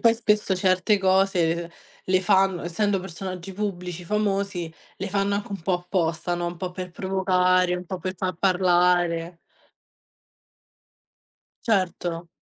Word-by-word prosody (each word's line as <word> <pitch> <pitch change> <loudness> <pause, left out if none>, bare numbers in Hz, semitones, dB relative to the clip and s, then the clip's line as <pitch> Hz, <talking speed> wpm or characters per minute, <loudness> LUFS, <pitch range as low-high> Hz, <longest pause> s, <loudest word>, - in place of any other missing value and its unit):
poi 230 -1 +5
spesso 210 -4 +1
certe 185 +2 +3
cose, 190 -3 +3
ehm, 170 - -10 0.4
le 185 0 +2
fanno 190 -1 +3
essendo 195 +3 0
personaggi 185 0 -6
pubblici 180 -3 -4
famosi, 195 -3 -1 0.2
le 195 - -4
fanno 200 +1 +1
anche 200 0 -3
un 195 - -5
po' 180 +2 0
apposta 175 -1 -1
no, 175 0 -2
un 175 0 -4
po' 185 +1 -4
per 180 0 -6
provocare 185 -1 +2
un 180 - -7
po' 185 +1 -5
per 185 0 -4
far 185 0 -2
parlare. 175 -2 +2 2.3
Certo. 180 -5 0
185 Hz, 135 wpm, -25 LUFS, 175-195 Hz, 2.3 s, poi